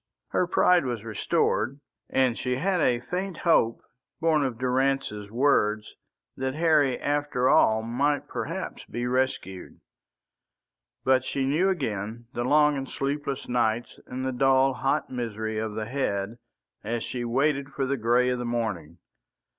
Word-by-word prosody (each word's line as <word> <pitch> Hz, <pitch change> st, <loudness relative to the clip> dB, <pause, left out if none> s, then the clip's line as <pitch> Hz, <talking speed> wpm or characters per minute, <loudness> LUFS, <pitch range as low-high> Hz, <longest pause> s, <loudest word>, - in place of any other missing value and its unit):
Her 180 Hz, -, +1 dB
pride 180 Hz, -1 st, +4 dB
was 120 Hz, -5 st, -3 dB
restored, 115 Hz, +4 st, 0 dB, 0.3 s
and 130 Hz, -3 st, +2 dB
she 125 Hz, +1 st, -2 dB
had 180 Hz, +6 st, 0 dB
a 120 Hz, -4 st, +3 dB
faint 180 Hz, +5 st, -4 dB
hope 115 Hz, -10 st, +2 dB, 0.4 s
born 160 Hz, -3 st, +2 dB
of 130 Hz, -4 st, -2 dB
Durrance's 130 Hz, -4 st, 0 dB
words 110 Hz, -3 st, +1 dB, 0.4 s
that 130 Hz, 0 st, -3 dB
Harry 155 Hz, -5 st, +3 dB
after 145 Hz, -3 st, 0 dB
all 110 Hz, -3 st, +4 dB
might 140 Hz, +5 st, 0 dB
perhaps 175 Hz, +6 st, -5 dB
be 120 Hz, 0 st, -4 dB
rescued. 125 Hz, -7 st, -2 dB, 1.2 s
But 130 Hz, -1 st, +3 dB
she 135 Hz, 0 st, -2 dB
knew 160 Hz, +8 st, +2 dB
again 115 Hz, -, -3 dB
the 120 Hz, -, -2 dB
long 150 Hz, +2 st, +4 dB
and 135 Hz, -1 st, -5 dB
sleepless 140 Hz, 0 st, -3 dB
nights 120 Hz, -1 st, 0 dB
and 130 Hz, +1 st, -4 dB
the 130 Hz, -, 0 dB
dull 135 Hz, +1 st, +3 dB
hot 135 Hz, +4 st, -1 dB
misery 110 Hz, -3 st, -3 dB
of 110 Hz, -1 st, -3 dB
the 110 Hz, 0 st, -3 dB
head 115 Hz, -4 st, -2 dB, 0.4 s
as 115 Hz, +2 st, -2 dB
she 125 Hz, -1 st, -4 dB
waited 135 Hz, +3 st, +1 dB
for 135 Hz, -1 st, -2 dB
the 140 Hz, +1 st, 0 dB
grey 120 Hz, +1 st, +2 dB
of 125 Hz, -1 st, -1 dB
the -, -, -3 dB
morning. 110 Hz, -10 st, -3 dB
130 Hz, 145 wpm, -26 LUFS, 115-140 Hz, 1.2 s, pride